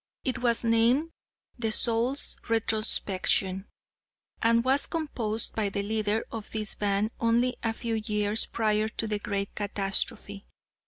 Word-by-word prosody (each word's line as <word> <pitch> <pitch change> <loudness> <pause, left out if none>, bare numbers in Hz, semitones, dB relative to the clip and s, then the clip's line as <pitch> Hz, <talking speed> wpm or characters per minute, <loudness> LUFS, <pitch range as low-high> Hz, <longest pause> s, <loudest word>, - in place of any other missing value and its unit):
It 255 - 0
was 240 -1 +2
named 235 +8 +3 0.5
'The 225 -2 0
Soul's 235 +5 +2
Retrospection,' 205 -3 0 0.7
and 230 0 +4
was 265 +3 +2
composed 235 -9 -2
by 215 -2 0
the 200 0 -2
leader 215 +1 0
of 220 -2 -6
this 215 -1 -2
band 205 +1 0
only 235 +2 +2
a 225 - 0
few 225 -1 -2
years 210 0 +1
prior 215 -1 +1
to 225 - -4
the 210 -1 -2
great 200 -1 -3
catastrophe. 200 0 -2
220 Hz, 130 wpm, -28 LUFS, 205-230 Hz, 0.7 s, and